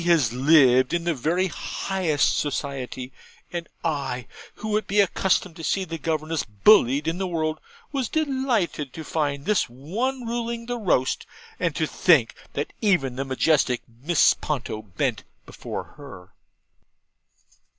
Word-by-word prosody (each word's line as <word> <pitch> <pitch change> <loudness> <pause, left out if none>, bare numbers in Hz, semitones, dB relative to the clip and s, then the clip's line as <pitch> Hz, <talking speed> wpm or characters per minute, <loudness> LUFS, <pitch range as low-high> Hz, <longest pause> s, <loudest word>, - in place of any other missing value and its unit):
'Has 165 -9 +3
lived 130 0 +5
in 170 - -1
the 170 0 +1
very 160 +7 0
highest 185 -3 0
society:' 135 -3 -3 0.4
and 170 -1 -4
I, 140 -6 -2 0.3
who 215 0 -4
have 215 - 0
been 205 0 +4
accustomed 185 -2 0
to 165 - -8
see 190 +3 0
governesses 160 -1 -2 0.2
bullied 145 - +6
in 165 +3 -1
the 190 - -1
world, 155 -3 -1 0.3
was 270 -6 -1
delighted 260 - 0
to 160 - -7
find 145 -3 -2
this 210 0 +2
one 225 - -3
ruling 235 0 -3
the 245 0 -3
roast, 150 - +1 0.3
and 170 -5 0
to 160 - +1
think 150 -7 +3 0.2
that 145 - -3
even 165 - +2
the 135 - -2
majestic 135 -1 +1 0.2
Mrs. 170 +2 +4
Ponto 125 -7 -3
bent 95 -7 -2 0.2
before - - -6
her. 95 -11 -12
160 Hz, 140 wpm, -24 LUFS, 135-190 Hz, 0.4 s, bullied